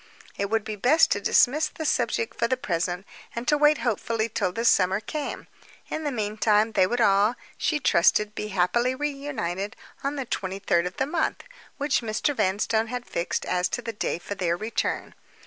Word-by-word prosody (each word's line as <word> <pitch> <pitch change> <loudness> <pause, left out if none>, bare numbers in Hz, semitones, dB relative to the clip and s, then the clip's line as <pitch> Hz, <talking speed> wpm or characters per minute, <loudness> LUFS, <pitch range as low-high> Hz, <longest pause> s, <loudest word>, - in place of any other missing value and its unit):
It 200 0 -2
would 220 0 +1
be 215 0 -4
best 260 +10 +4
to - - +1
dismiss 295 +5 +4
the 315 - -7
subject 455 +8 0
for 235 - +2
the 260 - 0
present, 180 -5 -2 0.3
and 235 +1 -4
to 295 - +4
wait 295 +1 +4
hopefully 230 0 0
till 185 - -1
the 230 +6 -3
summer 190 -2 +4
came. 290 +7 -5 0.5
In 315 - -3
the 290 - 0
meantime 215 -1 +1
they 185 -4 +3
would 245 +4 -1
all, 205 +1 +4 0.2
she 300 - 0
trusted, 210 -3 +3
be 210 - -4
happily 210 +7 +1
reunited 265 -9 -3 0.3
on 280 +1 -1
the 270 -2 -3
twenty 190 -4 -3
third 175 -3 +1
of 180 - -8
the 265 - +1
month, 320 +3 -1 0.3
which 285 -1 +1
Mr. 220 +4 -1
Vanstone 220 +1 +1
had 245 +1 -5
fixed 170 - -2
on - - -4
as 180 0 +1
the 250 - -3
day 205 - -2
for 175 - -6
their 175 -3 -1
return. 220 +4 -2
220 Hz, 190 wpm, -26 LUFS, 195-265 Hz, 0.5 s, best